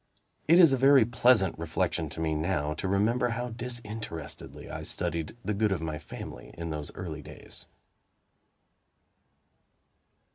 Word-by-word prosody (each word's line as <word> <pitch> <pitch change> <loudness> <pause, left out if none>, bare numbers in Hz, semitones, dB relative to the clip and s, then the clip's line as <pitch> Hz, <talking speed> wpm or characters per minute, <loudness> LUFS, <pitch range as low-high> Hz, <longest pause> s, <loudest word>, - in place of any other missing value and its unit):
It 165 +3 +7
is 165 -6 +8
a - - +3
very 135 -2 +6
pleasant 120 -6 +4
reflection 80 -1 -1
to 80 - -7
me, 80 -1 0
now, 75 -2 0
to 80 - -4
remember 115 +6 +2
how 120 +1 -2
disinterestedly 115 -8 -6
I - - -6
studied 85 +6 -3
the 105 - 0
good 105 +1 +1
of 95 - 0
my 80 -1 -4
family - - -9
in 85 -1 -4
those 75 -1 -4
early - - -5
days. - - -10
100 Hz, 140 wpm, -29 LUFS, 80-120 Hz, -, is